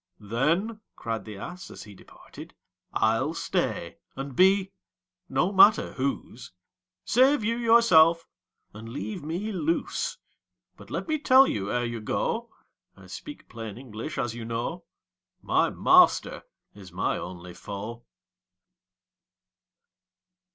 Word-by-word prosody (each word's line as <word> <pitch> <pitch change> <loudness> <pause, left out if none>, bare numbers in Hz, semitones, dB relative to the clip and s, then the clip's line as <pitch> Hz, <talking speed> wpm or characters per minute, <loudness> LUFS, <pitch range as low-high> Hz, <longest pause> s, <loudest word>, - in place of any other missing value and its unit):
"Then," 155 - -1 0.2
cried 115 -1 -4
the 105 -2 -8
ass, 180 - -8
as - - -10
he 105 - -13
departed 95 - -14 0.4
"I'll 115 +9 +1
stay, 120 - -2 0.2
and 135 -1 -6
be 190 +2 +4 0.6
no 190 - +1
matter 205 +2 +5
whose; 130 -4 -4 0.5
Save 260 +1 +4
you 230 +2 0
yourself, 180 -9 +5 0.5
and 110 +2 -10
leave 110 +2 -6
me 175 +8 -3
loose 170 -3 -2 0.6
But - - -15
let - - -4
me 310 -1 0
tell 265 -1 +6
you, 100 - -2
ere 120 0 0
you 115 -1 -4
go, 235 - -2 0.5
(I - - -15
speak 295 -1 -10
plain 115 -3 -8
English, 125 +3 -7
as 115 - -2
you 120 0 -7
know,) 120 +10 -4 0.5
My - - +1
master - - +4 0.3
is 95 -3 -13
my 95 +2 -1
only 90 0 -8
foe." 105 +6 -7
135 Hz, 125 wpm, -26 LUFS, -, 0.6 s, tell